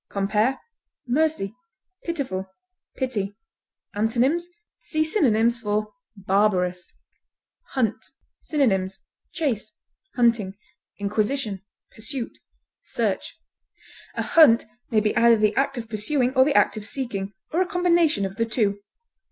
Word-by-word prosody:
Compare 210 +6 +1 0.5
MERCY; 260 -6 +1 0.5
PITIFUL; 255 - -3 0.5
PITY. 210 -6 -2 0.6
Antonyms: 250 +11 +1 0.3
See 310 -1 0
synonyms 235 - +2
for 210 -1 -2 0.2
BARBAROUS. 190 -2 +1 0.8
HUNT. 230 -5 0 0.4
Synonyms: 195 -10 +1 0.3
chase, 250 -10 -2 0.4
hunting, 230 -6 +2 0.4
inquisition, 210 +1 -1 0.3
pursuit, 245 +2 -5 0.5
search. - - -2 0.8
A - - -1
hunt 295 -9 +6 0.2
may 220 -3 +3
be 210 0 0
either 235 -1 +6
the 215 0 +2
act 275 -1 +1
of 230 -1 -5
pursuing 245 +4 0
or 260 0 +6
the 290 -1 +1
act - - +4
of 210 - -6
seeking, 205 -7 -4 0.2
or 340 - +1
a 370 - +1
combination 340 - +2
of 195 0 -6
the 230 - +1
two. 205 -3 0
225 Hz, 110 wpm, -24 LUFS, 205-275 Hz, 0.8 s, hunt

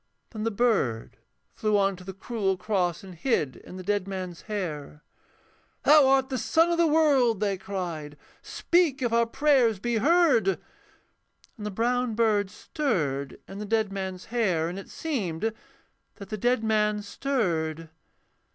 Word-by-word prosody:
Then 220 -1 -5
the - - +2
bird 200 - 0 0.4
flew 215 -1 +1
on 195 -1 +2
to 185 - -12
the 190 - -6
cruel 195 -2 -1
cross, 180 -4 -1
And 190 -1 -10
hid 165 - -1
in 185 - -11
the 185 - -7
dead 200 0 -1
man's 185 -3 -5
hair. 150 -7 -5 0.8
'Thou 295 -2 +7
art 265 0 +3
the 260 -2 -2
sun 330 +8 +3
of 340 - 0
the 340 - +5
world,' 280 -8 +3
they 200 -2 0
cried, 175 -6 -5 0.2
'Speak 335 -7 +1
if 235 -1 0
our 235 0 +3
prayers 255 -5 +3
be 235 +4 -1
heard.' 265 - +3 1.0
And 210 -4 -6
the - - -2
brown 240 +3 0
bird 210 -3 +2
stirred 155 - -2
in 195 +1 -8
the - - -4
dead 215 -1 0
man's 190 -2 -5
hair, 185 -9 +1
And 180 +3 -5
it 195 - -11
seemed 220 - -2 0.6
that 200 - -11
the 215 - -3
dead 245 +2 +1
man 210 -1 +1
stirred. 165 - -2
210 Hz, 160 wpm, -27 LUFS, 185-245 Hz, 1.0 s, Thou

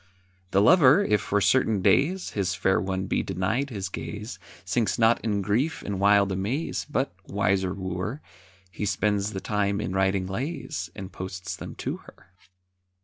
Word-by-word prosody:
The 100 +1 +3
lover, 150 - +6
if 105 - +2
for 105 0 0
certain 110 -3 +2
days 180 - +2
His 100 -2 -1
fair 95 -2 +2
one 95 0 -2
be - - 0
denied 110 - -1
his 100 -6 -4
gaze, 105 +1 -6 0.3
Sinks 110 +4 0
not 115 0 +4
in 105 -3 0
grief 120 - 0
and 100 -2 -3
wild 100 0 +4
amaze, 105 - -2
But, 135 -4 -1
wiser 95 -2 +1
wooer, 95 +6 -4 0.5
He 100 +4 -3
spends 105 +1 0
the 95 - -3
time 100 0 0
in 95 -3 -3
writing 95 0 +1
lays, 105 - -4
And 95 0 -7
posts 95 0 -6
them - - -8
to - - -4
her. 95 - -18
100 Hz, 160 wpm, -26 LUFS, 95-115 Hz, 0.5 s, lover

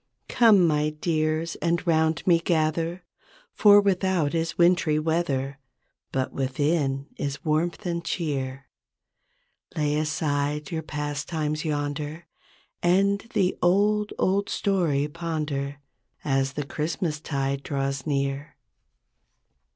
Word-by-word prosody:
''Come, 215 -7 +5
my 150 -1 +2
dears, 155 +1 -1
and 170 +1 0
'round 160 -1 +2
me 170 -2 +5
gather 165 +1 0 0.5
For 205 -1 +7
without 190 -6 +1
is 165 0 -1
wintry 170 -3 +3
weather. 150 -4 -1 0.5
But 130 -1 -2
within 135 +1 0
is 140 +1 -4
warmth 160 +4 0
and 170 -1 -2
cheer. 140 -6 -3 1.1
Lay 150 -1 +1
aside 150 -1 -1
your 160 -1 -2
pastimes 150 +1 -3
yonder 150 +2 -3 0.6
And 195 +3 +3 0.2
the 185 -1 +2
Old, 205 +4 +2
Old 200 +2 +1
Story 165 -8 +1
ponder. 150 -3 -3 0.5
As 135 -2 +1
the 145 0 -3
Christmastide 150 -3 -2
draws 135 0 -3
near. 140 0 -2
155 Hz, 105 wpm, -25 LUFS, 145-170 Hz, 1.1 s, For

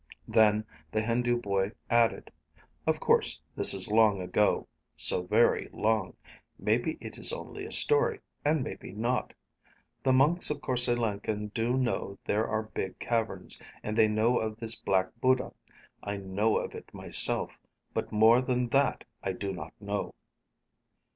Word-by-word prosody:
Then 110 -1 +3 0.3
the 110 - 0
Hindu 120 +2 0
boy 100 -2 -1
added, 115 -1 +1 0.6
"Of - - +1
course - - +2 0.2
this - - +7
is 95 +1 0
long 110 -2 +4
ago. 95 +3 0 0.3
So - - +2
very 105 +6 +2
long. 110 -3 -1 0.4
Maybe 120 +9 0
it - - -8
is - - +6
only - - -7
a - - -11
story. 450 -1 +3 0.2
And 150 -1 +1
maybe - - -8
not. 120 +4 -2 0.7
The 130 - +2
monks 145 +7 +4
of 150 - -2
Korse 125 -1 +1
Lenken 105 -3 -2
do 120 +3 0
know 120 -6 -2
there 105 +2 0
are 110 0 -1
big 95 -3 -6
caverns, 115 -2 -3 0.2
and 105 - -3
they 110 -1 +5
know 110 +3 +1
of 110 -1 -4
this 115 -1 0
Black 95 -3 0
Buddha. 130 0 +1 0.5
I 100 0 -4
know 100 +3 0
of - - -4
it - - -11
myself. - - +2 0.3
But - - -3
more 110 +3 +5
than 125 -1 -1
that 140 +2 +1 0.2
I 95 - -2
do 100 +1 -4
not 80 -3 -8
know." 100 0 -4
110 Hz, 155 wpm, -29 LUFS, 105-125 Hz, 0.7 s, this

